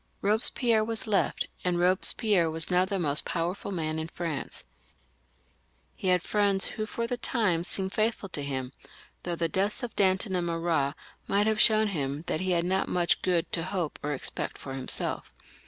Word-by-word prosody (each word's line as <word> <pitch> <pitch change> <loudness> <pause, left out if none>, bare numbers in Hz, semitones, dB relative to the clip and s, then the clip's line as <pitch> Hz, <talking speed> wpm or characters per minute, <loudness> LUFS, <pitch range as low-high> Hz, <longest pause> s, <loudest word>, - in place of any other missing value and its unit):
Eobespierre 220 +2 +3
was 225 0 0
left, 205 -3 +1 0.2
and 180 -1 +1
Eobespierre 180 0 +3
/vas 160 +2 +1
now 180 +1 +4
the 195 +1 -2
most 150 -5 +1
powerful 175 +4 -3
man 160 -4 -2
in 160 - -3
France, 165 -4 -5 1.3
He 190 - -4
had 180 -1 +3
faends 200 -2 +2
who 215 0 -4
for 230 +1 -3
the 245 +1 -2
time 205 -9 +1
seemed 190 +1 -2
faithful 215 -2 0
to 150 - -4
him, 130 -2 -3 0.5
though 175 -1 -3
the 165 0 0
deaths 200 +9 0
of 240 - -5
Danton 190 0 +2
and 175 -1 0
Marat 165 -4 0 0.3
might 200 +1 +2
have 220 0 +3
shown 220 0 +5
him 145 -4 -3
that 155 - -1
he 185 - -1
had 170 -1 +2
not 190 +2 +1
much 175 -1 +1
good 175 -3 0
to 165 - 0
hope 175 -3 -3
or 150 0 -2
expect - - -4
for 135 - -7
himself. 135 -1 -3
180 Hz, 180 wpm, -28 LUFS, 165-205 Hz, 1.3 s, shown